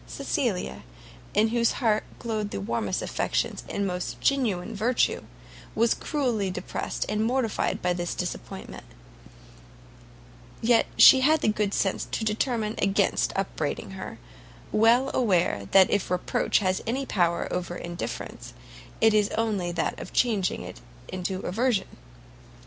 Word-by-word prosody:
Cecilia, 65 +1 -2 0.5
in 215 +2 +4
whose 235 0 +2
heart 220 -4 +1
glowed 215 -3 -3
the - - -4
warmest 105 -1 -2
affections - - -1
and 200 - -1
most 180 -1 -3
generous 225 -7 0
virtue, 230 +5 +1 0.5
was 230 +1 +3
cruelly 245 -10 -1
depressed 180 0 -4
and 215 +1 0
mortified 235 -1 0
by 180 0 +2
this 175 -1 -3
disappointment; - - -6 1.8
yet 230 0 +3
she 265 - +9
had 310 +3 +4
the - - +1
good 210 -1 0
sense 195 -1 0
to 220 - -3
determine 220 0 0
against 195 0 +2
upbraiding - - -3
her, - - -7 0.5
well 235 +5 +4
aware 175 - +1
that 190 -1 +6
if 205 - 0
reproach 180 0 +1
has 185 -2 0
any 265 +4 -1
power 170 -7 +1
over 175 -1 -3
indifference, 175 -1 -6 0.5
it 225 -1 +5
is 210 -1 +3
only 205 -6 0
that 170 -1 -2
of - - -8
changing 215 -7 +1
it - - -10 0.3
into 185 +1 -3
aversion. 220 +1 -1
210 Hz, 130 wpm, -26 LUFS, 180-230 Hz, 1.8 s, she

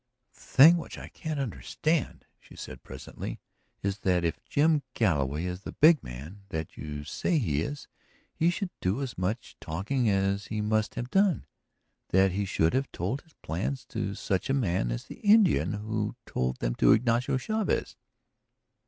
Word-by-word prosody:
"The - - -24
thing 160 +6 +7
which 165 - -7
I - - -8
can't 155 -3 -4
understand," 150 +5 -1
she - - -17
said - - -8
presently, - - -7 0.4
"is 100 0 -1
that 90 -2 +1
if 85 - -2
Jim 155 +1 +3
Galloway 75 - +1
is 90 +1 -4
the - - -7
'big 155 0 +6
man' 70 +12 -9
that 80 -3 -4
you 75 -1 -6
say 160 - 0
he 80 - +1
is 145 - -5 0.5
he 165 - +2
should 180 +1 -2
do 100 +10 0
as 130 - -5
much 95 +6 -3
talking 105 - -1
as 100 0 +1
he 110 - -3
must 110 +1 0
have 120 +1 -4
done; 195 -3 +3 0.6
that 95 +1 +4
he 100 +2 -1
should 80 -4 +1
have 135 +1 0
told 105 +11 -2
his 160 -3 -27
plans 120 - -3
to 100 - -3
such 95 +4 -1
a 135 - +3
man 90 - 0
as - - -3
the - - -11
Indian 205 - +4
who 105 0 -2
told 65 0 -1
them - - -1
to - - +6
Ignacio 120 +3 +2
Chavez." 215 +10 -1
105 Hz, 170 wpm, -28 LUFS, 90-140 Hz, 0.6 s, thing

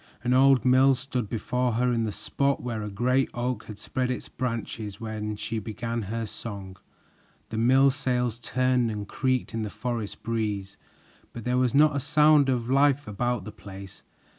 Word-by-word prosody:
An 125 +1 +2
old 135 -1 +5
mill 130 +1 +5
stood 125 -3 -3
before 125 +2 -1
her 125 +2 +1
in 115 -1 +1
the 110 - -2
spot 140 +6 -1
where 115 -3 -3
a 105 - -4
great 125 +6 +1
oak 120 -2 -2
had 105 - -9
spread 125 +3 -2
its 125 - -4
branches 115 -4 -4
when 110 -1 -4
she 110 +2 -3
began 115 +2 -4
her 115 +3 -3
song! 100 -3 -7 0.7
The 110 - -3
mill 135 +4 +5
sails 125 -4 -1
turned 125 0 +1
and 105 -2 -4
creaked 130 -1 -1
in 115 - -2
the 105 - -3
forest 115 -3 -4
breeze, 105 -4 -2 0.6
but 115 - -7
there 125 +2 0
was 130 +1 +1
not 150 0 +5
a - - +1
sound 150 0 +4
of 120 -3 0
life 140 +2 +3
about 120 +1 -1
the 110 - -6
place. 100 -2 -11
120 Hz, 180 wpm, -27 LUFS, 110-130 Hz, 0.7 s, old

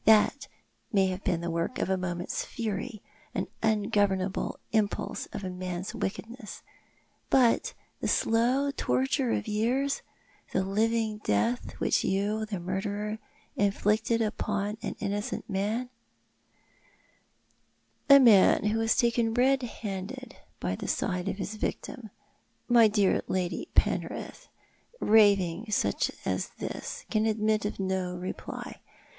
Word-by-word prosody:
That 220 +6 +5 0.4
may 195 -3 +3
have 185 +1 -4
been 170 -2 0
the 170 0 -2
work 170 +8 -2
of - - 0
a 190 - +2
moment's 175 -1 -3
fury, 215 0 -4 0.3
an - - 0 0.2
ungovernable 205 -3 +1
impulse 215 -2 -1
of 200 - -7
man's 180 0 -4
wickedness 225 +2 -5 0.3
— - - -35 0.3
but 250 -4 +3 0.2
the - - -2
slow 250 +5 +2
torture 130 - 0
of 105 -1 0
years^ 250 +7 0 0.2
— - - -27
the 190 - +2
living 215 +2 0
death 110 - 0
which - - +1
you, 205 +3 0
the 200 -4 -3
murderer, 205 +4 -3 0.4
inflicted 210 +3 +2
upon 210 -1 -2
an - - -4
innocent 205 0 -3
man 215 +5 -1 0.9
" - - -38
"A 280 0 +10
man 225 -7 +6
who 210 +2 +1
was 225 0 +2
taken 235 -1 +2
red 265 +2 +4
handed 200 -6 -6 0.2
by 90 +1 -1
the - - -6
side 180 0 -1
of 195 - -3
his 210 +2 -4
victim. 230 +1 -4 0.6
My 235 -2 +7
dear 205 -2 +2
Lady 185 -1 -2
Penrith, - - -1 0.5
raving 205 -2 +4
such 210 - +1 0.2
as - - -1
this - - -5
can 220 0 +2
admit 215 -1 +1
of 205 - -3
no 190 -1 -1
reply. 180 +1 -6
210 Hz, 130 wpm, -29 LUFS, 190-225 Hz, 0.9 s, A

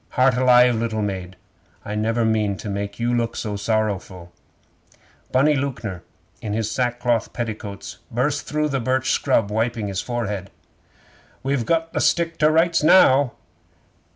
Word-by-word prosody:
Heart 130 0 +4
alive, 125 -1 +5
little 110 -1 -1
maid! 95 -2 -4 0.5
I 105 - -4
never 115 +2 0
meaned 105 -3 0
to 105 - -6
make 100 +1 -4
you 120 +1 0
look 115 -1 -1
sorrowful! 100 -4 -2 1.0
'Bunny 140 +4 +4
Lewknor 120 -10 -4 0.4
in 105 - -4
his 110 0 -1
sackcloth 120 -2 -1
petticoats 110 -4 -6
burst 135 +5 -1
through 150 0 0
the 135 -1 -1
birch 130 +1 0
scrub 105 -2 +1
wiping 110 -1 -1
his 95 -1 -2
forehead. 105 -6 -4 0.9
'We've 135 -4 -1
got 165 0 0
the - - 0
stick 170 -1 +1
to 150 - +5
rights 165 +2 +3
now! 140 -5 +5
115 Hz, 140 wpm, -22 LUFS, 105-130 Hz, 1.0 s, alive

